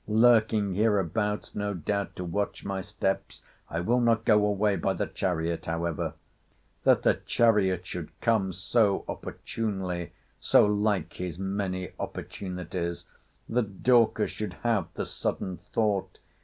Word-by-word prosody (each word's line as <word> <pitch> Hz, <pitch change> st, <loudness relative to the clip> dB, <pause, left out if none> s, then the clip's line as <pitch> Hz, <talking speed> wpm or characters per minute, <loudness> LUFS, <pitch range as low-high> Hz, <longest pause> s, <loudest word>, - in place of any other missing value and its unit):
—Lurking 110 Hz, -2 st, +4 dB
hereabouts, 105 Hz, 0 st, 0 dB
no 105 Hz, -1 st, -2 dB
doubt, 100 Hz, +4 st, -2 dB
to 90 Hz, -, -4 dB
watch 100 Hz, +4 st, -2 dB
my 95 Hz, -1 st, -2 dB
steps!—I 95 Hz, -3 st, -4 dB
will 120 Hz, +7 st, +2 dB
not 115 Hz, -1 st, +2 dB
go 105 Hz, -2 st, +5 dB
away 105 Hz, 0 st, +2 dB
by -, -, 0 dB
the -, -, -1 dB
chariot, 85 Hz, -2 st, -2 dB
however.—— 85 Hz, 0 st, -2 dB, 0.7 s
'That -, -, +4 dB
the -, -, +5 dB
chariot 100 Hz, -6 st, +3 dB
should 85 Hz, -2 st, -5 dB
come 110 Hz, -5 st, +2 dB
so 100 Hz, +2 st, +1 dB
opportunely! 95 Hz, -6 st, -4 dB, 0.3 s
So -, -, +5 dB
like 105 Hz, -1 st, +1 dB
his 90 Hz, -2 st, -5 dB
many 95 Hz, -2 st, -2 dB
opportunities!—That 90 Hz, +4 st, -5 dB
Dorcas 115 Hz, -3 st, +4 dB
should 105 Hz, -4 st, -4 dB
have 115 Hz, -4 st, +2 dB
the -, -, -2 dB
sudden 90 Hz, -2 st, -3 dB
thought! 105 Hz, -4 st, -1 dB
100 Hz, 125 wpm, -28 LUFS, 90-110 Hz, 0.7 s, go